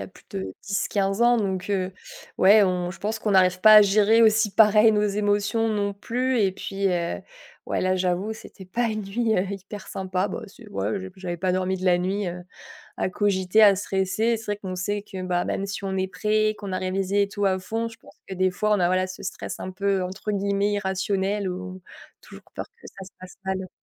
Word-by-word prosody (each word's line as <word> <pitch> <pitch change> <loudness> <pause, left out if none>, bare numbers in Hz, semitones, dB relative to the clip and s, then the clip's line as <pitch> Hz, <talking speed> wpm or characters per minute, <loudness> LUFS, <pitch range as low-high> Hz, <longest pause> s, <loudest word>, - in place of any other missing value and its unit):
a - - -6
plus - - -18
de 95 -1 -5
10-15 195 0 -1
ans, 240 0 +5
donc 190 -4 -2
heu, 190 -2 -1 0.4
ouais, 205 +3 +6
on 180 -2 0
je 170 - -13
pense 220 +2 -2
qu'on 215 -1 -1
n'arrive 185 -1 +4
pas 215 +2 +8
à 210 - +10
gérer 210 +3 +4
aussi 220 -1 +4
pareil 215 0 +6
nos 210 0 +2
émotions, 205 +2 +1
non 205 -2 -1
plus 250 +5 -1
et 195 -2 +2
puis, 195 +1 -3
heu, 170 - -1 0.5
ouais, - - -1
là, 185 0 +1
j'avoue, 185 +3 -1
c'était 195 -3 -13
pas 240 +6 -1
une 215 -2 -2
nuit, 220 +3 0
heu, 180 - +2
hyper 195 +1 -8
sympa, 190 0 -2
bah, - - -5
c'est 210 +2 -15
ouais, 205 0 -2
j'ai 190 0 -8
j'avais 180 -2 -5
pas 185 +2 -1
dormi 185 +1 0
de 185 - -7
la 180 -1 +4
nuit, 190 +2 -1
heu, 175 +1 -6 0.6
à - - 0
cogiter, 190 +1 +2
à 205 -2 +7
stresser 190 +1 -1
et 230 0 +2
c'est 225 - -10
vrai 205 0 -2
qu'on 190 -3 -6
sait 205 +3 -2
que, 190 -2 -8
bah, 180 -1 -1
même 195 - -2
si 200 0 -5
on 190 -1 -2
est 190 0 0
prêt, 215 +2 0
qu'on 200 -2 -6
a 185 - -1
révisé 195 +2 0
et - - -2
tout 205 0 -2
à 190 -1 +2
fond, 225 +4 -3
je 225 - -14
pense - - -18
que - - -5
des 185 0 +2
fois, 210 +4 -1
on 205 - +2
a, 175 - +3
voilà, 185 +1 +1
ce 185 0 -9
stress - - -6
un - - -5
peu, 195 0 0
entre 190 +3 -4
guillemets 200 0 0
«irrationnel» 195 0 -1
ou 185 +1 -7 0.4
toujours - - -14
peur - - -4
que 465 - -15
ça 190 - -11
se 190 - -14
passe 185 0 -12
mal. 190 -1 -3
195 Hz, 230 wpm, -24 LUFS, 185-210 Hz, 0.6 s, à